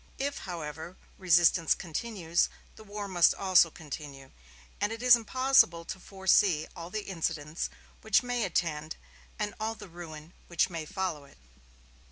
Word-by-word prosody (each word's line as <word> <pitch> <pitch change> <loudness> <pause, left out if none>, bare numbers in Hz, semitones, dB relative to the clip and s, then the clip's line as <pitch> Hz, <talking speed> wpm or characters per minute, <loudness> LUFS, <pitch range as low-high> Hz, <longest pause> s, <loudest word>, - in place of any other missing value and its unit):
If, 285 +1 -2
however, 160 +1 -6 0.2
resistance 175 -2 +4
continues, 175 -1 -1 0.3
the 220 - -13
war 205 -1 -6
must 175 -3 +4
also 185 -3 +5
continue; 145 -4 -9 0.5
and 205 +1 +1
it 225 +1 -6
is 250 -1 +9
impossible 235 -7 +3
to 185 - -6
foresee 190 -4 +2
all 170 0 -8
the 210 +2 -4
incidents 165 -3 -3 0.3
which 220 +3 +3
may 245 -1 -1
attend 160 -4 -2 0.4
and 210 -1 -2
all 220 +1 -2
the 205 -2 -11
ruin 165 -2 -10
which 175 +1 +1
may 165 -2 -4
follow 185 -7 -3
it. 140 - -20
175 Hz, 145 wpm, -29 LUFS, 160-210 Hz, 0.5 s, is